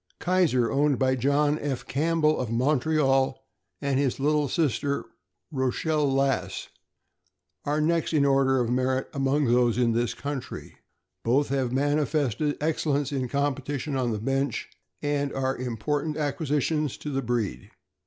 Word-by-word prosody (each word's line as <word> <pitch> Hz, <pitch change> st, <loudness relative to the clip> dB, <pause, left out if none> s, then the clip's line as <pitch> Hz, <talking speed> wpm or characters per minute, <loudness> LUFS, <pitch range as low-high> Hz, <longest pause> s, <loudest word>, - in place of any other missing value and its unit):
Kaiser, 175 Hz, -10 st, +2 dB
owned 140 Hz, 0 st, +2 dB
by 130 Hz, -1 st, +2 dB
John 145 Hz, +4 st, +2 dB
F. 140 Hz, -3 st, -3 dB
Campbell, 155 Hz, +1 st, +1 dB
of 125 Hz, -, -2 dB
Montreal, 135 Hz, +1 st, +2 dB, 0.4 s
and 140 Hz, -2 st, 0 dB
his 135 Hz, -2 st, 0 dB
litter 150 Hz, 0 st, +2 dB
sister, 145 Hz, -3 st, 0 dB, 0.5 s
Rochelle 145 Hz, +2 st, 0 dB
Lass, 135 Hz, 0 st, 0 dB, 1.0 s
are 150 Hz, +1 st, 0 dB
next 165 Hz, +1 st, +1 dB
in 150 Hz, -3 st, +3 dB
order 135 Hz, -1 st, +3 dB
of 120 Hz, -1 st, 0 dB
merit 130 Hz, +1 st, 0 dB
among 140 Hz, +1 st, +1 dB
those 120 Hz, -1 st, +3 dB
in 120 Hz, -2 st, +3 dB
this 120 Hz, +1 st, 0 dB
country. 140 Hz, -3 st, -6 dB, 0.5 s
Both 135 Hz, +5 st, +2 dB
have 130 Hz, -3 st, 0 dB
manifested 145 Hz, 0 st, 0 dB
excellence 145 Hz, -2 st, 0 dB
in 130 Hz, -3 st, -1 dB
competition 140 Hz, 0 st, -2 dB
on 130 Hz, -2 st, 0 dB
the 110 Hz, -, -1 dB
bench, 135 Hz, +3 st, -1 dB, 0.3 s
and 145 Hz, -1 st, 0 dB
are 135 Hz, 0 st, -1 dB
important 145 Hz, +5 st, -2 dB
acquisitions 150 Hz, -1 st, -1 dB
to 150 Hz, -, -6 dB
the 135 Hz, 0 st, -1 dB
breed. 120 Hz, -4 st, -2 dB
140 Hz, 135 wpm, -26 LUFS, 130-150 Hz, 1.0 s, in